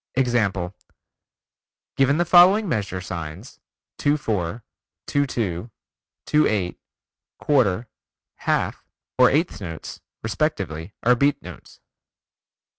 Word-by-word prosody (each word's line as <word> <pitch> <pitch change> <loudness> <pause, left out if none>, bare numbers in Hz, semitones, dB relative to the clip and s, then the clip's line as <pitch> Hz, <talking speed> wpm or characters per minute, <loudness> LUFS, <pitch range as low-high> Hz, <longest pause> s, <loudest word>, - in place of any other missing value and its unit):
Example 105 -8 0 1.2
Given 135 +2 +3
the 175 - +2
following 185 +5 +6
measure 100 - -2
signs: 90 +4 -7 0.4
2 145 +1 +2
4, 105 - -3 0.4
2 145 0 +1
2, 105 -4 -3 0.6
2 150 0 +3
8, 95 -5 -1 0.6
quarter, 120 -6 +2 0.5
half, - - -1 0.4
or 125 - +7
eighth 150 - 0
notes, 80 -5 -7 0.2
respectively, 100 - -2
are 125 - +5
beat 140 +3 +2
notes. - - -12
115 Hz, 100 wpm, -23 LUFS, 95-145 Hz, 1.2 s, or